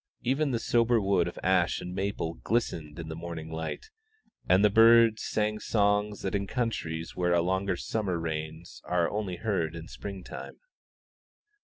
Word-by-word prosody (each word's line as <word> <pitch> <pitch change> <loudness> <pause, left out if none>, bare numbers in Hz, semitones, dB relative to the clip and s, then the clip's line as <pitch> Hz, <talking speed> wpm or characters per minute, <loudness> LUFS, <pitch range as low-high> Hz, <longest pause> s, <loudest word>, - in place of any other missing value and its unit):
Even 140 +4 +1
the 125 - 0
sober 115 0 +2
wood 100 -1 +2
of - - -7
ash 90 -1 +2
and 90 - -6
maple 95 -4 -2
glistened 80 -9 -2
in 85 -1 -6
the 80 - -5
morning 80 -1 -6
light, 80 - -5 0.6
and 95 +3 +6
the - - +6
birds 115 0 +6
sang 105 0 -1
songs 105 -1 +1
that 95 - -2
in 100 -1 -1
countries 85 -9 -3
where 90 -1 +1
a 85 - +4
longer 95 +1 0
summer 95 -1 -2
reigns 80 0 -5
are 90 -1 +1
only 100 -3 -2
heard 85 -6 -1
in 85 0 -8
spring 100 -2 -7
time. - - -8
95 Hz, 165 wpm, -29 LUFS, 85-110 Hz, 0.6 s, and